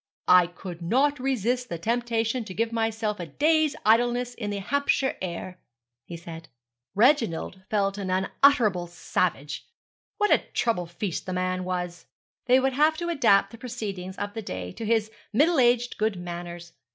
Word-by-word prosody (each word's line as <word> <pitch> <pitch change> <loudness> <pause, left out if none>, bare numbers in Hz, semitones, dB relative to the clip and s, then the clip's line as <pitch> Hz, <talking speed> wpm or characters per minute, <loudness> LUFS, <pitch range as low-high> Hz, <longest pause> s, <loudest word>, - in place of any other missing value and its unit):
'I 180 -1 +7
could 175 0 -9
not 270 +11 +2
resist 250 -1 -1
the 170 - -3
temptation 230 +4 -1
to 185 - -8
give 230 +1 0
myself 220 -2 -1
a 175 - -5
day's 310 - +2
idleness 240 +2 +3
in 210 -4 -5
the 205 - -2
Hampshire 265 +5 0
air,' 180 0 -5 0.5
he 170 - -7
said. 165 -1 -10 0.5
Reginald 220 - +2
felt 200 -1 0
unutterably 190 +1 +2
savage. 165 -4 -2 0.5
What 415 0 +2
a - - +6 0.2
trouble 200 -7 0
feast 175 +2 -4
the 185 - -2
man 185 0 -1
was. 180 -1 -4 0.4
They 255 +1 +6
would 265 0 +1
have 305 +4 +3
to 345 +1 -3
adapt 200 -11 +3
the 230 - -12
proceedings 200 -7 -6
of 205 0 -4
the 225 - -4
day 90 - -5
to 225 - -7
his 220 -1 +1 0.2
middle 300 +7 +4
aged 240 -1 +2
good 215 -1 +1
manners. 175 -1 -7
215 Hz, 160 wpm, -26 LUFS, 180-245 Hz, 0.5 s, I